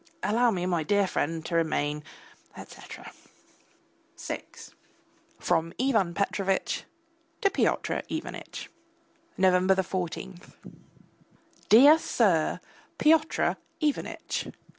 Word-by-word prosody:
Allow 235 +3 +3
me, 180 -5 -1
my 175 -3 0
dear 200 +6 +2
friend, 165 -2 -2
to - - -5
remain, 150 -2 0 0.5
etc. - - -11 1.1
VI - - -5 1.0
(FROM 165 +1 0
IVAN 220 -10 +1
PETROVITCH 195 0 -1 0.5
TO 400 - +3
PYOTR 400 - 0
IVANITCH) - - -6 0.7
November 185 0 +4
14. 180 0 -5 1.3
DEAR 285 +8 +8
SIR, 185 - +1 0.4
PYOTR 310 0 +3 0.2
IVANITCH! 300 -3 -2
190 Hz, 85 wpm, -27 LUFS, 170-235 Hz, 1.3 s, DEAR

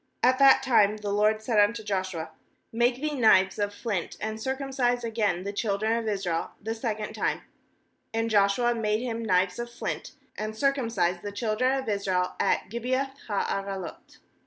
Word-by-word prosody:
2At 255 +2 +4
that 270 -1 +7
time 215 -5 +4
the 210 -1 -4
LORD 215 +1 +2
said 220 -2 +2
unto 220 +2 +3
Joshua: 185 -5 -3 0.4
'Make 240 +2 +2
thee 305 +1 -2
knives 210 -7 +4
of 205 0 0
flint, 205 -4 -3
and 220 +1 -4
circumcise 265 -2 -1
again 215 -6 0
the 200 +1 -4
children 215 +1 0
of 230 -1 -2
Israel 190 -5 -2
the 225 +2 -3
second 220 -2 -3
time/ - - -1 0.7
8And 225 0 0
Joshua 210 +3 +3
made 215 -1 0
him 230 -2 -3
knives 185 -1 +1
of 240 0 -4
flint, 235 - -5 0.2
and 215 +1 -5
cir 275 +3 +3
cumcised 195 -10 -1
the 205 - -5
children 235 +5 0
of 265 - -4
Israel 190 -3 0
at - - +1
Kjribeath 255 +4 -1 0.2
ha 205 -3 0
araloth. 195 -3 -5
220 Hz, 170 wpm, -27 LUFS, 200-240 Hz, 0.7 s, that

